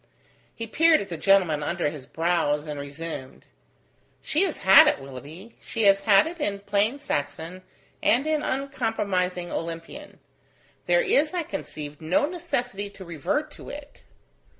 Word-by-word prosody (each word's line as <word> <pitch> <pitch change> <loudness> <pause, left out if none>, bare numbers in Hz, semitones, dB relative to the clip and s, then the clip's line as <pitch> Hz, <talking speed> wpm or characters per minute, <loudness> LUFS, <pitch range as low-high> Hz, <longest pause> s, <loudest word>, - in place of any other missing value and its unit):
He 230 - -5
peered 320 +8 +4
at 200 - -6
the 170 - -4
gentleman 180 -4 +3
under 145 0 -1
his 145 -4 -10
brows, 160 -3 0
and 150 -2 -5
resumed: 140 -1 -7 0.8
"She 310 - +1
has 350 - -3
had 190 0 +9
it, - - +2
Willoughby; 145 - -11
she 225 - -3
has 195 -1 +6
had 195 +2 +5
it 335 +2 -6
in 200 -8 -2
plain 205 +5 +1
Saxon 160 - -4 0.4
and 255 +5 +3
in 310 -1 +1
uncompromising 210 -11 -2
Olympian. 165 - -6 0.7
There - - +4
is, 385 -7 +2
I 350 - 0
conceive, 150 - -7
no 165 - +2
necessity 250 - -3
to 195 -1 -12
revert 290 - -2
to - - -11
it." 290 0 -10
195 Hz, 150 wpm, -25 LUFS, -, 0.8 s, had